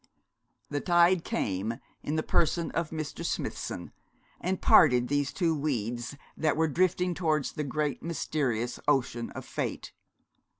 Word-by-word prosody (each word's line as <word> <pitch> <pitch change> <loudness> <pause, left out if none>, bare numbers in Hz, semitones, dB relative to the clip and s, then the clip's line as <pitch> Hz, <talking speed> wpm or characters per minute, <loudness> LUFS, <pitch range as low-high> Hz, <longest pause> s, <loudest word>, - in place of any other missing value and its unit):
The 145 -1 -1
tide 175 0 +4
came, 100 +3 -1 0.3
in 150 - -2
the 155 - 0
person 170 0 +1
of 165 -1 -1
Mr. 155 -2 -5
Smithson, - - -3 0.5
and 185 +1 -1
parted 125 -5 +6
these 145 0 +1
two 170 -4 +1
weeds 120 -3 -2 0.2
that 155 -2 +1
were 160 0 +3
drifting 180 +3 +1
towards 155 -5 0
the 150 - -3
great 150 +1 -1
mysterious 130 -8 -1
ocean 120 -5 +1
of - - -6
fate. - - -4
150 Hz, 135 wpm, -29 LUFS, 125-165 Hz, 0.5 s, parted